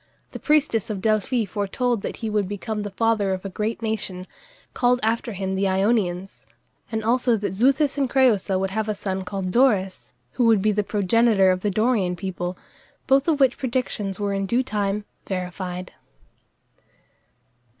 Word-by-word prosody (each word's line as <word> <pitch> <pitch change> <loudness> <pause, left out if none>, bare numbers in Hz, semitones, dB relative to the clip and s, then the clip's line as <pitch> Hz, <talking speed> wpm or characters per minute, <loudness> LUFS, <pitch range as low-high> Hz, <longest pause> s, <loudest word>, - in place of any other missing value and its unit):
The - - -7
priestess 295 -9 +2
of 210 -3 -3
Delphi 215 +3 +1
foretold 210 +4 -1
that - - -5
he - - -1
would 210 -2 0
become 210 +1 -4
the 205 - -4
father 205 -1 +1
of 185 +1 -5
a - - -3
great 215 +4 -3
nation, 195 -4 -2 0.5
called 245 0 +2
after 230 +1 0
him 190 0 -3
the 195 +1 +1
Ionians, 190 -1 0 0.4
and 220 -1 -2
also 240 +1 +2
that 200 -3 -3
Xuthus 275 +6 +2
and 270 -2 +1
Crëusa 215 -8 +3
would 190 0 -1
have 215 +1 -2
a 210 - -1
son 190 -1 -3
called 190 -1 -4
Dorus, 205 -7 +1 0.2
who 245 - +1
would 225 -3 +5
be 215 - +3
the 210 0 0
progenitor 205 -1 +3
of 185 - 0
the 205 - -1
Dorian 210 -3 +1
people, 180 -1 -4 0.5
both 270 +2 +3
of 310 -3 +2
which 265 -2 +3
predictions 235 -7 -2
were 200 -1 -1
in 195 0 -1
due 240 +5 +1
time 205 -3 -2 0.2
verified. 180 -1 -5
210 Hz, 170 wpm, -23 LUFS, 190-235 Hz, 0.5 s, would